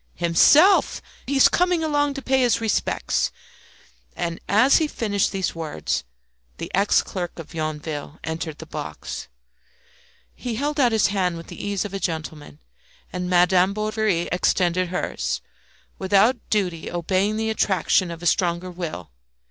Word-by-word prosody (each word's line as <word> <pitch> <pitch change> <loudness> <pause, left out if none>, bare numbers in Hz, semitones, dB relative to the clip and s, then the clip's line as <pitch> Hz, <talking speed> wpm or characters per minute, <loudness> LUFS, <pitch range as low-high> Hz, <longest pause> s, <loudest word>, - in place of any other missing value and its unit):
"Himself! 285 - +5 0.3
He's 270 0 +5
coming 355 -2 +1
along 290 -2 +1
to 275 - -6
pay 265 0 +2
his 245 -3 +3
respects." 225 -2 0 0.8
And 170 -1 -3
as 220 +8 +5
he 315 - +1
finished 205 -8 -1
these 190 -1 -2
words 155 - -3 0.5
the - - -6
ex 200 +2 +3
clerk 175 -3 -5
of 165 -1 -10
Yonville 155 -1 -4
entered 160 -1 -4
the - - -9
box. - - -6 1.1
He 245 -3 -5
held 290 +5 -2
out 250 -3 +4
his 220 -2 +3
hand 180 -4 0
with 165 - -10
the - - -8
ease 205 -1 -1
of 200 - -7
a 195 - -3
gentleman; 155 - -5 0.6
and 180 0 -3
Madame 180 +2 +4
Bovary 215 -4 0
extended 180 0 +1
hers, 180 - -2 0.6
without 205 +5 +2
doubt 195 -5 +1 0.2
obeying 190 +5 0
the 220 0 -1
attraction 190 -3 +1
of 170 0 -8
a - - -5
stronger 175 +1 +1
will. 165 - -6
190 Hz, 145 wpm, -23 LUFS, 170-220 Hz, 1.1 s, Himself